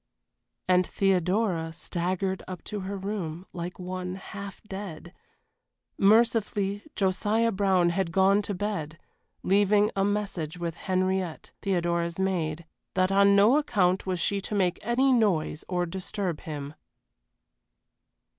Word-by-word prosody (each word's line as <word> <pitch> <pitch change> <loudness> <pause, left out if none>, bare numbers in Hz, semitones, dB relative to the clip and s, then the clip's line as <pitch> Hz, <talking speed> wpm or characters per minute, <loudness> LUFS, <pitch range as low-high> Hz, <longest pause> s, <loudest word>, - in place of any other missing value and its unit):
And 185 -1 +4
Theodora 185 -2 +1
staggered 185 +3 -2
up 185 -2 -7
to 210 - -5
her 195 +1 -4
room 190 -4 -4
like 175 0 -5
one 185 0 -4
half 200 0 -8
dead. 190 -4 -8 0.8
Mercifully 205 -2 +3
Josiah 210 +4 +1
Brown, 190 -3 +2
had 180 -1 -1
gone 195 +2 +4
to 205 -1 -4
bed, 180 -6 -3 0.5
leaving 205 +2 +3
a 195 - +2
message 195 -6 -2
with 170 -1 -3
Henriette, 185 -1 -1
Theodora's 170 -3 0
maid, 170 -4 -1 0.3
that 185 0 +2
on 200 0 +5
no 210 +8 +6
account 195 -11 +1
was 185 -2 -1
she 200 +3 0
to 210 - -4
make 185 -3 +1
any 255 +4 +3
noise 190 -10 +1
or 180 -1 0
disturb 180 -1 -4
him. 145 -2 -6
190 Hz, 125 wpm, -27 LUFS, 175-200 Hz, 0.8 s, no